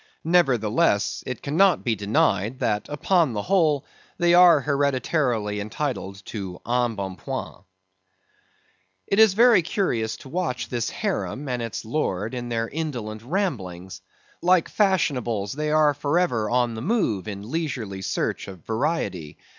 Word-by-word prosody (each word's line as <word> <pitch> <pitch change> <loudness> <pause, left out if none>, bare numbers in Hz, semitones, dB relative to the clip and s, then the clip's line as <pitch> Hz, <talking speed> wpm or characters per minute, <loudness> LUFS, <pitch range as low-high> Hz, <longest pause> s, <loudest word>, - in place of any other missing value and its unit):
Nevertheless, 115 - +2
it 125 -3 -5
cannot 170 +5 +3
be 120 - +1
denied, 105 +2 +1
that 105 -4 -1
upon 155 -1 +1
the 105 -2 -3
whole 160 -7 +2 0.3
they 175 -1 +3
are 175 -4 +7
hereditarily 130 -6 0
entitled 100 -3 -4
to 95 -5 -6
en 120 -1 +1
bon 95 -2 -5
point. - - -6 1.4
It 195 - 0
is 220 -4 +6
very 230 -3 +6
curious 120 - -1
to 135 - -13
watch 130 -7 -2
this 120 -2 -2
harem 145 +2 -3
and 125 -2 -2
its 115 -2 -5
lord 110 -5 -2
in 120 -1 -4
their 115 -1 -1
indolent 120 -9 -4
ramblings. 95 - -3 0.4
Like 180 -1 +3
fashionables, 125 - 0
they 150 +2 -2
are 155 -1 +4
for 145 +3 -1
ever 120 -12 +1
on 120 -1 +1
the 110 - -6
move 125 - 0
in 105 +2 -7
leisurely 125 - -3
search - - -2
of 95 -4 -11
variety. 110 - -2
125 Hz, 140 wpm, -24 LUFS, 105-160 Hz, 1.4 s, are